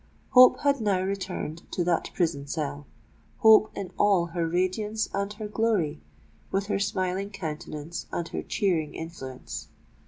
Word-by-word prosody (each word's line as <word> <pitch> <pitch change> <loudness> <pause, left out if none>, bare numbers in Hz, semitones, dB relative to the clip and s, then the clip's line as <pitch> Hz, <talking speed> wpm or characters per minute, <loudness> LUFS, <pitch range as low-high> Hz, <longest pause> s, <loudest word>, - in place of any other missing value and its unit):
Hope 255 -1 +7
had 280 -3 +2
now 200 -4 +2
returned 185 -4 -3
to 175 - +1
that 170 -1 0
prison 160 -6 0
cell,—hope 145 - +1
in 195 -2 -5
all 195 -4 +4
her 170 -2 0
radiance 185 +5 0
and 200 +1 -1
her 215 0 -6
glory,—with 200 -2 -2
her 200 - -1
smiling 190 0 -1
countenance 160 -4 -6
and 170 - -2
her - - -3
cheering 175 -8 0
influence! 135 -6 -7
185 Hz, 130 wpm, -27 LUFS, 160-205 Hz, -, Hope